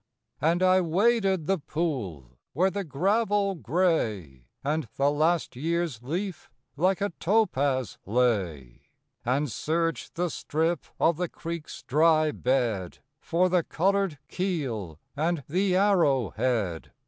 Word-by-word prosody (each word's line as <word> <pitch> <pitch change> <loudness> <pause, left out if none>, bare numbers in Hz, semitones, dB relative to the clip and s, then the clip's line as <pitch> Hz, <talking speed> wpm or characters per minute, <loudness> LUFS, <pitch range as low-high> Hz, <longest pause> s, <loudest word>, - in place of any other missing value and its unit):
And 170 +4 +2
I 185 0 +5
waded 190 0 +2
the 195 +2 +1
pool 115 - -4
where 185 +6 +2
the 200 +1 -3
gravel 200 +5 +1
gray, 110 - -1 0.2
And 150 -1 -1
the 140 +1 +2
last 160 0 +1
year's 165 -2 -1
leaf, 175 +8 -4 0.3
like 185 +6 +1
a 200 - 0
topaz 145 - +1
lay. 95 - 0 0.4
And 135 +2 0
searched 165 +8 -2
the 175 -1 -1
strip 160 +2 -1
of 165 -1 +3
the 180 -1 -2
creek's 165 -1 -7
dry 155 +2 +3
bed 120 -10 -1 0.2
For 175 +3 +1
the 180 -1 +3
colored 195 0 0
keel 125 - -3 0.2
and 160 0 0
the 185 +4 +1
arrow 170 - +3
head. 105 -10 -1
160 Hz, 125 wpm, -27 LUFS, 125-180 Hz, 0.4 s, I